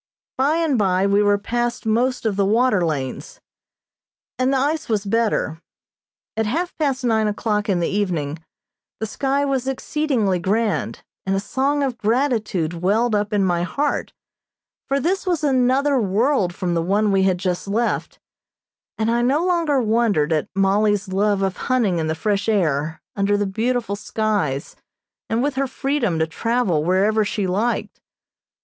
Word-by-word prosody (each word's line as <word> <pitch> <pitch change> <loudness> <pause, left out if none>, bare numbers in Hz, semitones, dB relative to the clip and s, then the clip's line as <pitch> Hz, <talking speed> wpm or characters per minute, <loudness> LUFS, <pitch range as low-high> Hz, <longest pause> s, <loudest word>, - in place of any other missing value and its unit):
By 280 +4 +2
and 320 -7 +1
by 190 -1 +2
we 200 +1 +3
were 205 0 +3
past 240 +3 -2
most 245 +3 +1
of 215 -3 +1
the 200 - +2
water 215 -1 +2
lanes, 140 -6 -3 1.0
and 255 +1 +2
the 275 - +2
ice 295 +3 -1
was 210 -2 0
better. 210 -6 0 0.7
At 220 -1 0
half 340 +10 -2
past 275 -4 0
nine 220 -2 +2
o'clock 210 0 -1
in 185 -3 +2
the 170 - +1
evening 170 -7 -2 0.6
the 220 - -2
sky 275 +5 0
was 265 -2 -1
exceedingly 265 -7 0
grand, 210 +4 -1 0.2
and 195 - +1
a - - +1
song 275 +7 0
of 260 -4 -2
gratitude 220 - 0
welled 220 +5 +2
up 210 0 0
in 205 -2 +2
my 175 -2 +1
heart, 280 +11 -1 0.8
for 275 +1 +1
this 370 +7 -1
was 345 -4 0
another 270 0 +2
world 210 0 +1
from 180 -3 -2
the 165 - +1
one 205 +4 +1
we 195 -1 +3
had 190 -1 +2
just 180 +1 -2
left, 230 +4 -1 0.8
and 225 +1 0
I 235 +1 +1
no 280 +8 +2
longer 335 -6 +2
wondered 215 -9 +2
at 155 - -1
Mollie's 200 +1 +2
love 200 +1 +1
of 190 -1 -1
hunting 220 -9 +1
in 160 - -1
the 160 - -1
fresh 205 +5 -1
air, 160 -6 0 0.2
under 200 +1 +1
the 205 - 0
beautiful 225 +2 -1
skies, 205 -10 -2 0.5
and 225 +2 0
with 290 0 0
her 275 0 +1
freedom 265 - -1
to 160 - +2
travel 195 -2 0
wherever 200 +5 +2
she 205 -1 -2
liked. 205 +6 -1
215 Hz, 165 wpm, -21 LUFS, 195-255 Hz, 1.0 s, we